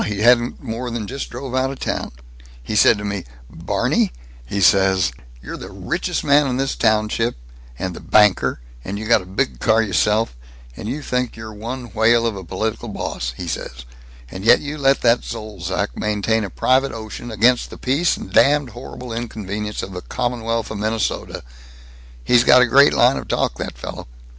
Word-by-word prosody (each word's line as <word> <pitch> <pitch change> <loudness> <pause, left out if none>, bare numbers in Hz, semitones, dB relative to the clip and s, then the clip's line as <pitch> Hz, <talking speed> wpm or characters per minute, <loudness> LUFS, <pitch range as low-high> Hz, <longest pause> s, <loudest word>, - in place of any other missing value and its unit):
He 105 -1 -3
hasn't 120 +1 +3
more 115 +2 -4
than 115 -2 -4
just 135 +5 -5
drove 130 +1 -7
out 130 +1 +1
of 135 - -6
town. - - -3 0.5
He 85 - -4
said 105 +1 +6
to 105 - -6
me, 100 -3 -3 0.3
'Barney,' - - 0 0.4
he 100 - -2
says, 95 -4 +4 0.3
'you're - - -6
the - - -9
richest - - -3
man 145 0 +4
in 125 -1 -1
this 135 0 0
township, 110 +1 +1 0.4
and 95 0 -3
the - - -8
banker, 105 - +3 0.2
and 100 +1 -5
you 110 - -5
got 110 -1 +4
a 90 - -13
big 70 -10 -2
car 110 - +3
y'self, 105 - +1 0.4
and 105 - -6
you 145 +4 -4
think 125 -2 -2
you're 110 -1 -8
one 120 +3 -7
whale 115 +1 +4
of 115 -3 -1
a 95 - -7
political 110 +6 -3
boss,' 60 -10 -4
he 90 - -6
says, 60 -5 -5 0.5
'and 95 - -7
yet 115 - +6
you 145 +1 -5
let 135 0 +3
that 120 0 +3
Zolzac 100 -4 -4
maintain 105 +1 0
a 100 - -4
private 130 +8 +1
ocean, 110 +2 -7
against 120 +3 +2
the - - -10
peace 140 +7 +1
and 95 - -9
damn 145 -1 +4
horrible 120 +1 -8
inconvenience 105 -2 -4
of 95 - -6
the 90 -1 -6
Commonwealth 115 -1 -2
of 105 - -5
Minnesota 110 +1 -2 0.4
' - - -21
He's 120 - +4
got 125 0 +7
a - - +5
great 140 +4 +6
line 125 +3 +4
of - - -6
talk, - - -1
that - - -5
fellow. - - -7
110 Hz, 190 wpm, -20 LUFS, 100-125 Hz, 0.5 s, got